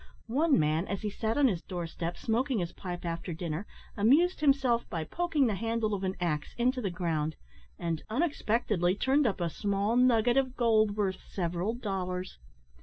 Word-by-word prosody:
One 285 +6 +3
man, 155 +3 +1
as 200 0 -4
he 210 - -1
sat 220 +3 -2
on 285 -2 +5
his 185 -8 -1
door 175 -3 -5
step 170 +1 -4
smoking 245 +3 0
his 175 -4 -2
pipe 175 -2 -6
after 170 +1 -3
dinner, 170 +2 -4 0.3
amused 295 - +4
himself 270 -5 +2
by 165 -2 -2
poking 320 - 0
the 225 - +1
handle 225 +1 -1
of 195 -1 -2
an 190 0 -1
axe 155 -4 -2
into 250 +2 +1
the 200 - -1
ground, 160 -4 -1 0.4
and, 165 -2 -2
unexpectedly, 220 - +1
turned 265 +5 +2
up 195 - -1
a 170 - 0
small 200 +5 0
nugget 245 -1 +4
of 260 -2 +1
gold 220 -3 +3
worth 190 -3 0
several 180 +4 -2
dollars. 185 - -4
205 Hz, 180 wpm, -30 LUFS, 175-245 Hz, 0.4 s, on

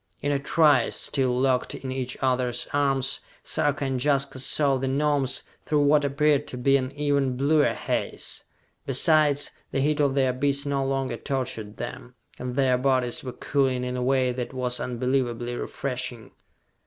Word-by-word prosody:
In 145 - -1
a 140 - +1
trice, 145 -3 +3
still 130 -3 +1
locked 130 -1 +1
in 130 - -6
each 130 -1 -4
other's 125 -2 0
arms, 135 -2 +1 0.2
Sarka 145 -2 0
and 130 -2 -1
Jaska 140 -2 +1
saw 140 +1 +3
the 135 +1 -2
Gnomes 140 -1 +1 0.2
through 150 -1 +2
what 145 +1 +4
appeared 145 +1 +2
to 125 - -7
be 135 +2 +3
an 130 -1 0
even 140 -3 0
bluer 145 +2 +3
haze. - - -3 0.4
Besides, 145 +1 +3 0.2
the - - -2
heat 150 +2 +1
of 140 -2 +2
the 135 -2 +3
abyss 140 +3 0
no 140 -1 0
longer 135 0 -2
tortured 125 -6 -4
them, 120 +1 -7 0.2
and 125 0 -4
their 130 -2 +2
bodies 130 -2 0
were 130 - -5
cooling 130 -1 0
in 125 0 -3
a 125 - -2
way 130 0 +2
that 125 +1 -5
was 125 -1 -1
unbelievably 120 -1 -1
refreshing. 125 -3 -4
135 Hz, 165 wpm, -25 LUFS, 125-140 Hz, 0.4 s, what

